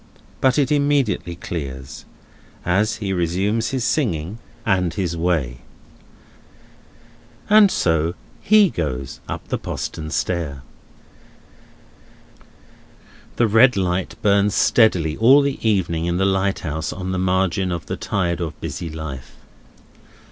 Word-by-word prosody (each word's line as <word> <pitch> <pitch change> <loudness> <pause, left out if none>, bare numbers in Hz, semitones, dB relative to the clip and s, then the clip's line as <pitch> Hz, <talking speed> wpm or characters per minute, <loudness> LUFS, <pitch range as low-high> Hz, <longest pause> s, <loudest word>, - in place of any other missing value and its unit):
But 130 0 +3
it 140 -2 +2
immediately 140 -11 +1
clears, 70 -7 -7 0.6
as 100 +5 +1
he 100 -3 -3
resumes 95 +6 0
his 130 -3 -2
singing, 105 - -1 0.3
and 90 -5 +1
his 90 -4 -2
way. 80 -8 -1 1.9
And 210 -1 +7
so 80 - 0 0.3
he 210 -4 +5
goes 70 -5 -4
up - - -6
the - - -1
postern 80 -1 -5
stair. 75 -5 -2 2.7
The 120 - +3
red 115 +2 +5
light 90 -1 -1
burns 100 0 +3
steadily 90 -9 +3
all 130 +6 +6
the 140 -1 -2
evening 90 -7 0
in 85 0 0
the 95 - +2
lighthouse 95 -5 -1
on 95 0 -5
the 95 - -1
margin 95 0 +1
of 85 -3 -4
the - - -4
tide 90 -3 -2
of 80 -3 -5
busy 80 +2 -5
life. 80 -4 -8
90 Hz, 120 wpm, -21 LUFS, 80-110 Hz, 2.7 s, And